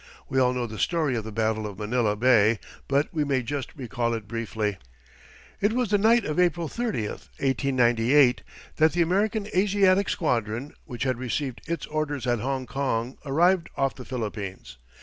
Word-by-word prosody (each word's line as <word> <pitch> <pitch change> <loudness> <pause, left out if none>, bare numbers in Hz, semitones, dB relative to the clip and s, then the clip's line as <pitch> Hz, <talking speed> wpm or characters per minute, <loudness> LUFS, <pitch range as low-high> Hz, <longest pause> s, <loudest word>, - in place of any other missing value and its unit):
We 135 - +1
all 125 -1 +4
know 125 -1 -2
the 110 -2 -7
story 160 -7 +1
of 115 - -2
the 110 - -6
battle 110 0 0
of 100 -2 -9
Manila 110 0 0
Bay, 110 -1 +4 0.3
but 140 +3 +1
we 155 -2 +1
may 135 -3 0
just 140 +3 -4
recall 120 -3 -2
it 110 -3 -7
briefly. 110 -2 -3 0.8
It 205 +2 +2
was 245 -4 0
the 205 - +4
night 230 +3 +4
of 155 +2 -1
April 175 -2 +2
30, 225 - -2
1898, 130 0 +2 0.4
that 155 0 +4
the 175 0 +3
American 205 +4 0
Asiatic 195 0 +3
squadron, 120 -2 -1
which 120 -3 -5
had 130 -3 -1
received 130 +1 -3
its 165 -2 -3
orders 150 -3 -2
at 120 -2 +1
Hongkong, 130 -1 -2
arrived 170 +5 +2
off 135 -1 +1
the 130 - -10
Philippines. 100 - -6
130 Hz, 170 wpm, -26 LUFS, 115-160 Hz, 0.8 s, all